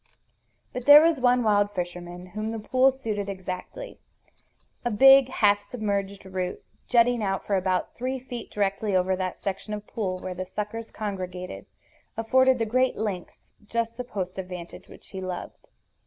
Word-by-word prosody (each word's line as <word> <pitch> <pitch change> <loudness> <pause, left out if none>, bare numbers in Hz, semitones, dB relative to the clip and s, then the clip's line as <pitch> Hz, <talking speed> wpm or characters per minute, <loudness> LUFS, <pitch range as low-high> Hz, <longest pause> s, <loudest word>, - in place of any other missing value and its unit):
But 250 -1 -5
there 295 +1 +11
was 330 -3 +3
one 245 0 +4
wild 205 -1 +2
fisherman 175 0 -5
whom 215 +1 -3
the 225 - -3
pool 255 +5 +3
suited 215 -6 -4
exactly. 185 - -6 0.8
A 240 - 0
big 270 +4 +7
half 205 -5 +3
submerged 200 -3 -3
root, 185 -1 -4 0.2
jutting 240 -1 +4
out 195 -1 -1
for 200 - +1
about 185 -1 0
three 255 +2 -3
feet 245 -2 -8
directly 200 0 -1
over 185 +1 +2
that 185 -1 -3
section 200 +2 -4
of 210 0 -8
the - - -25
pool 190 -5 -2
where 185 0 -5
the 185 +1 -5
suckers 210 +3 -5
congregated, 185 -3 -5 0.5
afforded 260 +3 +4
the 225 - 0
great 255 +3 +2
lynx 200 -5 -5
just 230 0 -2
the 250 - -4
post 190 -5 -5
of 185 - -5
vantage 180 -2 -9
which - - -13
he 190 - -6
loved. 185 -1 -6
205 Hz, 170 wpm, -26 LUFS, 185-240 Hz, 0.8 s, there